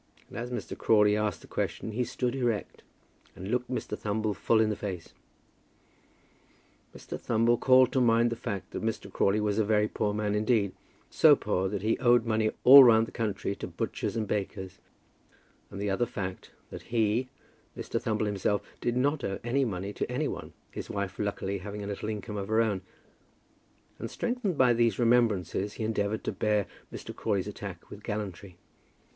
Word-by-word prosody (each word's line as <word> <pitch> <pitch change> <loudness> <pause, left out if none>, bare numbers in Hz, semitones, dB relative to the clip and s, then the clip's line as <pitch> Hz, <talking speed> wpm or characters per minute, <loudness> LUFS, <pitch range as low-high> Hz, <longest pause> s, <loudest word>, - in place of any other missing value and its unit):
And - - -12
as 120 +1 -4
Mr. 125 - -5
Crawley 105 -2 +4
asked 105 0 -1
the - - -14
question 110 - -3
he 120 +4 -1
stood 125 0 -2
erect, 120 -5 -2 0.5
and 95 +3 -6
looked 125 0 -1
Mr. 130 - -3
Thumble 105 0 -1
full 110 +3 +2
in 110 -1 +3
the - - -1
face. 95 -5 -6 1.8
Mr. - - -7
Thumble 115 +1 +2
called 130 -1 +5
to 130 - +2
mind 115 0 +4
the - - -1
fact, 100 -4 -5
that - - -4
Mr. 110 -3 -3
Crawley 100 +2 +2
was 105 0 0
a - - +4
very 105 0 +2
poor 105 -1 -1
man 105 0 -1
indeed, 105 -2 +2 0.4
so - - +7
poor 95 +1 -1
that 100 -1 -4
he 110 +1 +1
owed 120 -2 +4
money 110 -1 +1
all 135 +2 +11
round 115 -2 +6
the - - -12
country 105 -3 -2
to - - -5
butchers - - -3
and 110 -2 -1
bakers, 95 -2 -4 0.9
and 100 - -8
the 100 0 -1
other 120 +5 +1
fact, 95 -3 -5 0.2
that - - -7
he, 115 +2 +1 0.5
Mr. - - -3
Thumble 110 -1 0
himself, 105 0 0 0.2
did 120 0 -1
not 140 +2 +1
owe 95 - -2
any 130 +4 +1
money 100 -3 -3
to - - -3
any 145 +4 0
one, - - -6 0.2
his - - -7
wife 100 -2 -4
luckily 100 -1 -2
having 105 +2 -6
a - - -5
little 105 +1 -4
income 105 0 -5
of 100 -1 -4
her 110 +1 +2
own; 105 -5 +1 1.2
and, - - -5
strengthened 235 - -2
by 125 -2 +5
these 115 -3 +2
remembrances, 105 -5 +2
he 115 - -5
endeavoured 110 -1 -1
to - - -2
bear 105 -2 +1 0.3
Mr. - - -8
Crawley's 100 -3 -1
attack 100 -3 -8
with 100 - -9
gallantry. 100 -4 -5
110 Hz, 185 wpm, -29 LUFS, 100-120 Hz, 1.8 s, all